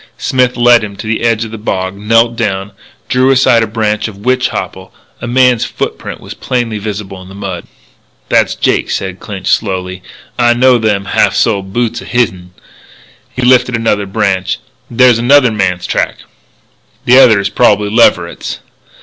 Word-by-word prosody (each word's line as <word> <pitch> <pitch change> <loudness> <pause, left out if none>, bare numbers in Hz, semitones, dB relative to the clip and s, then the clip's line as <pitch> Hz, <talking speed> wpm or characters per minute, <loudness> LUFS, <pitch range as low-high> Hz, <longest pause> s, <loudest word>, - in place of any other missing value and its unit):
Smith 125 -1 0
led 120 -1 +4
him 100 -1 -6
to 100 - -9
the 110 0 -2
edge 115 -1 0
of 110 - -9
the 110 - -8
bog, 95 -3 -3
knelt 115 +3 +1
down, 100 -3 -3 0.4
drew 130 +1 +2
aside 130 -3 +4
a 115 - 0
branch 105 0 -1
of 105 -3 -10
witch 130 0 +1
hopple. - - -6 0.3
A - - -5
man's 125 -1 +3
footprint - - -5
was - - -9
plainly 120 -4 -3
visible 100 -2 -6
on 95 0 -12
the 95 - -12
mud. 95 -4 -6 0.6
"That's - - +1
Jake," - - 0
said 95 -1 -4
Clinch 100 -3 -8
slowly. 95 -3 -1 0.4
"I 120 -1 +3
know 125 0 +4
them 105 -3 0
half - - +1
soled 100 -4 0
boots 120 +2 -2
o' - - -11
hisn." 95 -7 -2 0.8
He 130 - -5
lifted 125 0 +3
another 105 -3 -1
branch. 95 -3 -1 0.3
"There's 120 -1 +4
another 125 0 +4
man's 90 -4 -1
track!" - - -2 0.8
"The 125 +2 +6
other 110 -6 +6
is 100 0 -1
probably 105 -4 +2
Leverett's." 90 -6 +1
110 Hz, 165 wpm, -12 LUFS, 100-120 Hz, 0.8 s, The